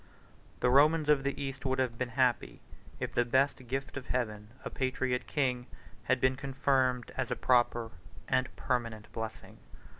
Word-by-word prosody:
The 125 Hz, -, +3 dB
Romans 150 Hz, +3 st, +5 dB
of 150 Hz, -2 st, +5 dB
the 140 Hz, 0 st, -2 dB
East 135 Hz, 0 st, -4 dB
would 130 Hz, -1 st, 0 dB
have 125 Hz, -3 st, -1 dB
been 125 Hz, -1 st, -1 dB
happy, 125 Hz, -2 st, +1 dB, 0.4 s
if -, -, -3 dB
the 120 Hz, -, +2 dB
best 130 Hz, +1 st, +1 dB
gift 135 Hz, +3 st, -3 dB
of 130 Hz, -, -7 dB
Heaven, 105 Hz, -4 st, -2 dB, 0.2 s
a -, -, -4 dB
patriot 130 Hz, -1 st, -1 dB
king, 125 Hz, -4 st, 0 dB, 0.4 s
had -, -, +2 dB
been 130 Hz, 0 st, +3 dB
confirmed 130 Hz, -2 st, 0 dB
as -, -, -2 dB
a -, -, 0 dB
proper 120 Hz, -2 st, +2 dB, 0.4 s
and 130 Hz, 0 st, +1 dB
permanent 115 Hz, -4 st, -2 dB
blessing. 110 Hz, -1 st, -6 dB
130 Hz, 160 wpm, -31 LUFS, 120-135 Hz, 0.4 s, Romans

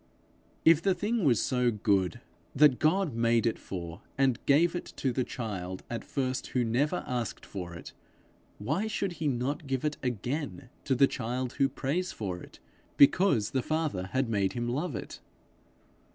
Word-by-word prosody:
If 165 Hz, -1 st, +7 dB
the 190 Hz, 0 st, +2 dB
thing 210 Hz, +4 st, -1 dB
was 120 Hz, -7 st, +4 dB
so 125 Hz, -2 st, +2 dB
good 105 Hz, 0 st, +1 dB, 0.3 s
that 145 Hz, -2 st, +5 dB
God 160 Hz, -1 st, +2 dB
made 115 Hz, 0 st, +2 dB
it 115 Hz, -, 0 dB
for 85 Hz, 0 st, -7 dB, 0.2 s
and 130 Hz, -3 st, +2 dB
gave 160 Hz, +5 st, +5 dB
it 175 Hz, -, -3 dB
to 130 Hz, -, 0 dB
the 130 Hz, -, +1 dB
child 95 Hz, -7 st, -5 dB
at 120 Hz, -, -3 dB
first 130 Hz, -2 st, -2 dB
who 125 Hz, -, 0 dB
never 140 Hz, +10 st, +1 dB
asked 120 Hz, -3 st, -3 dB
for 90 Hz, -3 st, -6 dB
it, 85 Hz, -, -10 dB, 0.6 s
why 155 Hz, -, -1 dB
should 200 Hz, -3 st, -1 dB
he 155 Hz, -, +1 dB
not 140 Hz, +4 st, -1 dB
give 135 Hz, +1 st, -1 dB
it 150 Hz, 0 st, -1 dB
again 130 Hz, +3 st, -3 dB, 0.2 s
to 135 Hz, -, +2 dB
the 140 Hz, -, +6 dB
child 125 Hz, 0 st, -3 dB
who 135 Hz, -, +4 dB
prays 150 Hz, +7 st, -2 dB
for 90 Hz, -4 st, -4 dB
it -, -, -13 dB, 0.4 s
because 140 Hz, -, +5 dB
the 130 Hz, -, +1 dB
Father 155 Hz, -, -1 dB
had 130 Hz, +5 st, 0 dB
made 100 Hz, -4 st, 0 dB
him 120 Hz, 0 st, -2 dB
love 140 Hz, +4 st, -2 dB
it? -, -, -7 dB
130 Hz, 170 wpm, -29 LUFS, 115-150 Hz, 0.6 s, If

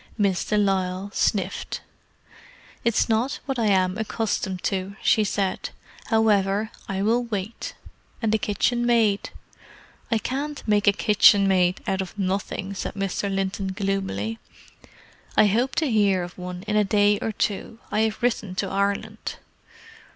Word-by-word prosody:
Miss 200 Hz, -4 st, +1 dB
de 210 Hz, -, 0 dB
Lisle 195 Hz, -1 st, 0 dB
sniffed. 195 Hz, -1 st, -1 dB, 1.0 s
"It's 235 Hz, -2 st, +2 dB
not 235 Hz, +4 st, 0 dB
what 270 Hz, -3 st, -2 dB
I 225 Hz, -, +2 dB
am 190 Hz, 0 st, +2 dB
accustomed 205 Hz, -4 st, -2 dB
to," 195 Hz, 0 st, -2 dB
she 215 Hz, -, +4 dB
said. 200 Hz, -2 st, -1 dB, 0.4 s
"However, 215 Hz, -1 st, +2 dB, 0.2 s
I 195 Hz, 0 st, -1 dB
will 235 Hz, +3 st, +2 dB
wait. 215 Hz, -1 st, -5 dB, 0.4 s
And 225 Hz, -2 st, 0 dB
the 220 Hz, -, +2 dB
kitchenmaid?" 235 Hz, -2 st, +1 dB, 0.8 s
"I 225 Hz, -, +4 dB
can't 280 Hz, +5 st, -4 dB
make 205 Hz, -1 st, +2 dB
a -, -, +9 dB
kitchenmaid 195 Hz, -3 st, +4 dB
out 190 Hz, 0 st, 0 dB
of 190 Hz, +2 st, -7 dB
nothing," 195 Hz, 0 st, -2 dB
said 195 Hz, -, -5 dB
Mr. 195 Hz, 0 st, -2 dB
Linton 195 Hz, 0 st, -2 dB
gloomily. 190 Hz, -, -2 dB, 1.0 s
"I -, -, +7 dB
hope 235 Hz, +7 st, +1 dB
to 310 Hz, -6 st, +1 dB
hear 200 Hz, -4 st, +3 dB
of 175 Hz, 0 st, -8 dB
one 180 Hz, 0 st, -7 dB
in 210 Hz, 0 st, -2 dB
a 210 Hz, -, +5 dB
day 205 Hz, 0 st, +3 dB
or 225 Hz, -, -2 dB
two; 210 Hz, +1 st, -2 dB
I 210 Hz, -, +1 dB
have 220 Hz, +1 st, 0 dB
written 220 Hz, -6 st, 0 dB
to 195 Hz, -, -1 dB
Ireland." 200 Hz, +3 st, -2 dB
205 Hz, 145 wpm, -24 LUFS, 190-220 Hz, 1.0 s, a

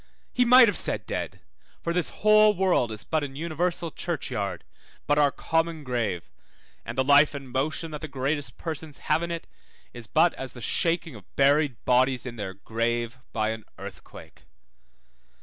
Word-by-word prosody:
he 250 Hz, -, +3 dB
might 250 Hz, 0 st, +8 dB
have 205 Hz, -, +1 dB
said -, -, -1 dB
dead, -, -, -5 dB, 0.4 s
for 170 Hz, -, -1 dB
this 175 Hz, -2 st, +1 dB
whole 215 Hz, 0 st, +5 dB
world 180 Hz, -11 st, +2 dB
is 105 Hz, -2 st, -3 dB
but 155 Hz, +7 st, -1 dB
an 135 Hz, -2 st, -6 dB
universal 170 Hz, +2 st, -2 dB
churchyard, 115 Hz, -, -3 dB, 0.4 s
but 145 Hz, 0 st, +2 dB
our 145 Hz, -1 st, +5 dB
common 165 Hz, 0 st, -1 dB
grave, 115 Hz, -9 st, -2 dB, 0.5 s
and 115 Hz, +2 st, -7 dB
the 130 Hz, -, +3 dB
life 145 Hz, +2 st, +5 dB
and 135 Hz, -3 st, -8 dB
motion 155 Hz, +5 st, -2 dB
that 150 Hz, -, -6 dB
the 155 Hz, -, -5 dB
greatest 140 Hz, 0 st, -2 dB
persons 160 Hz, -2 st, -5 dB, 0.2 s
have -, -, +2 dB
in 170 Hz, -, -3 dB
it 170 Hz, -1 st, -4 dB, 0.5 s
is 120 Hz, -2 st, -9 dB
but 175 Hz, -, +3 dB
as 130 Hz, -1 st, -4 dB
the 125 Hz, -, -10 dB
shaking 165 Hz, +5 st, 0 dB
of 105 Hz, -6 st, -15 dB
buried 140 Hz, -2 st, +3 dB
bodies 130 Hz, 0 st, +2 dB
in 125 Hz, -2 st, -6 dB
their 100 Hz, -4 st, -5 dB
grave, 120 Hz, +3 st, -2 dB
by 110 Hz, -1 st, 0 dB
an 110 Hz, 0 st, -5 dB
earthquake. -, -, -11 dB
145 Hz, 170 wpm, -26 LUFS, 120-165 Hz, 0.5 s, might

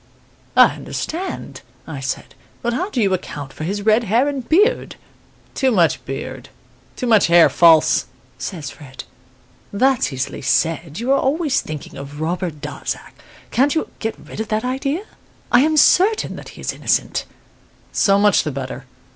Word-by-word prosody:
"'I -, -, +6 dB
understand,' 360 Hz, +4 st, -5 dB, 0.2 s
I 155 Hz, -4 st, -6 dB
said; 135 Hz, 0 st, -4 dB, 0.3 s
'but 240 Hz, 0 st, 0 dB
how 360 Hz, -, -2 dB
do 260 Hz, -, -3 dB
you 200 Hz, -4 st, +2 dB
account 145 Hz, -6 st, -5 dB
for 155 Hz, -, -6 dB
his 200 Hz, +3 st, -3 dB
red 220 Hz, +2 st, +3 dB
hair 230 Hz, +7 st, +2 dB
and 275 Hz, -4 st, -4 dB
beard?' 415 Hz, +10 st, +2 dB, 0.6 s
"'Too 265 Hz, -, +2 dB
much 175 Hz, -9 st, +2 dB
beard 135 Hz, -1 st, -6 dB, 0.5 s
too -, -, -4 dB
much 220 Hz, -6 st, +4 dB
hair 170 Hz, 0 st, +6 dB
false,' 165 Hz, -2 st, +5 dB, 0.3 s
says 155 Hz, -7 st, -5 dB
Fred. 140 Hz, -3 st, -11 dB, 0.7 s
"'That's 255 Hz, -, +2 dB
easily 130 Hz, -1 st, -4 dB
said. 165 Hz, +3 st, 0 dB
You 245 Hz, +3 st, -1 dB
are 275 Hz, -, +4 dB
always 285 Hz, 0 st, +1 dB
thinking 155 Hz, -3 st, -8 dB
of 140 Hz, +2 st, -8 dB
Robert 165 Hz, -1 st, -3 dB
Darzac. 145 Hz, -2 st, -5 dB
You -, -, -23 dB
can't 285 Hz, +5 st, 0 dB
get 225 Hz, 0 st, -3 dB
rid -, -, -11 dB
of 220 Hz, -, -2 dB
that 215 Hz, +3 st, -1 dB
idea? 275 Hz, +7 st, -2 dB, 0.5 s
I 245 Hz, -, +6 dB
am 310 Hz, +2 st, +2 dB
certain 395 Hz, +8 st, +4 dB
that -, -, -10 dB
he -, -, -10 dB
is -, -, -2 dB
innocent.' -, -, 0 dB, 0.7 s
"'So 195 Hz, -1 st, +3 dB
much 205 Hz, 0 st, +4 dB
the 155 Hz, -, -3 dB
better. 130 Hz, -1 st, -6 dB
200 Hz, 165 wpm, -20 LUFS, -, 0.7 s, I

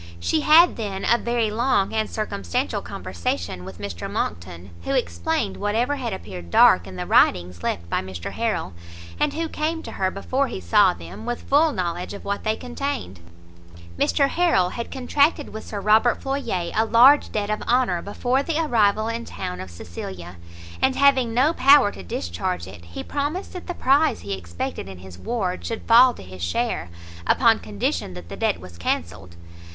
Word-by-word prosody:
She 85 Hz, -, +1 dB
had 335 Hz, +3 st, +6 dB
then 200 Hz, -4 st, -4 dB
a 235 Hz, -, +4 dB
very 235 Hz, -2 st, 0 dB
long 220 Hz, -3 st, +1 dB
and 220 Hz, -1 st, 0 dB
circumstantial 100 Hz, -, -2 dB
conversation 90 Hz, 0 st, -4 dB
with 95 Hz, -1 st, -9 dB
Mr 100 Hz, -4 st, -6 dB
Monckton, 85 Hz, +2 st, -4 dB
who -, -, -1 dB
explained 85 Hz, -, -1 dB
whatever 230 Hz, +8 st, 0 dB
had 245 Hz, -4 st, -3 dB
appeared 90 Hz, -, -7 dB
dark 85 Hz, +1 st, +5 dB
in 95 Hz, -, -9 dB
the 90 Hz, 0 st, -4 dB
writings 90 Hz, 0 st, +3 dB
left 85 Hz, -1 st, -3 dB
by -, -, -1 dB
Mr 95 Hz, -2 st, -7 dB
Harrel, 225 Hz, -, -2 dB, 0.5 s
and -, -, +1 dB
who 330 Hz, +1 st, -1 dB
came 320 Hz, +1 st, -2 dB
to -, -, -7 dB
her 190 Hz, -1 st, 0 dB
before 260 Hz, +8 st, -1 dB
he -, -, -5 dB
saw 85 Hz, -1 st, +4 dB
them, 85 Hz, +4 st, -10 dB
with 240 Hz, -, -3 dB
full 300 Hz, +3 st, +4 dB
knowledge 180 Hz, -2 st, -3 dB
of -, -, -11 dB
what 200 Hz, 0 st, -2 dB
they 215 Hz, 0 st, +1 dB
contained. 250 Hz, -, -5 dB, 0.8 s
Mr 275 Hz, -, +2 dB
Harrel 330 Hz, -, +2 dB
had 235 Hz, -, -5 dB
contracted 285 Hz, +3 st, +1 dB
with 220 Hz, -, -8 dB
Sir 205 Hz, -, -4 dB
Robert 215 Hz, +4 st, +3 dB
Floyer 270 Hz, -11 st, -2 dB
a 220 Hz, -, +3 dB
large 260 Hz, +5 st, +6 dB
debt 210 Hz, 0 st, -2 dB
of 215 Hz, -, -2 dB
honour 240 Hz, -8 st, +2 dB
before 245 Hz, +6 st, 0 dB
the 310 Hz, +2 st, -2 dB
arrival 220 Hz, -8 st, +2 dB
in 230 Hz, +1 st, -3 dB
town 90 Hz, -, -6 dB
of 95 Hz, -, -8 dB
Cecilia; 85 Hz, +1 st, -8 dB, 0.4 s
and 265 Hz, -, +3 dB
having 270 Hz, -4 st, +4 dB
no 260 Hz, +8 st, +3 dB
power 275 Hz, -7 st, +6 dB
to -, -, -10 dB
discharge 85 Hz, -1 st, -3 dB
it, 90 Hz, -2 st, -12 dB
he 85 Hz, -, -7 dB
promised 295 Hz, +6 st, -3 dB
that 360 Hz, -, -8 dB
the 355 Hz, -, -4 dB
prize 285 Hz, +4 st, +2 dB
he 100 Hz, -1 st, -4 dB
expected 90 Hz, 0 st, -5 dB
in 95 Hz, -, -9 dB
his 90 Hz, -1 st, -12 dB
ward 195 Hz, -, -2 dB
should 230 Hz, -, -4 dB
fall 245 Hz, +2 st, +6 dB
to -, -, -11 dB
his 95 Hz, 0 st, -11 dB
share, 85 Hz, 0 st, -1 dB, 0.4 s
upon 230 Hz, -3 st, +4 dB
condition 100 Hz, -3 st, -3 dB
that 90 Hz, -1 st, -10 dB
the -, -, -6 dB
debt 85 Hz, -, 0 dB
was 85 Hz, -1 st, -12 dB
cancelled. 85 Hz, +1 st, -3 dB
200 Hz, 180 wpm, -23 LUFS, -, 0.8 s, had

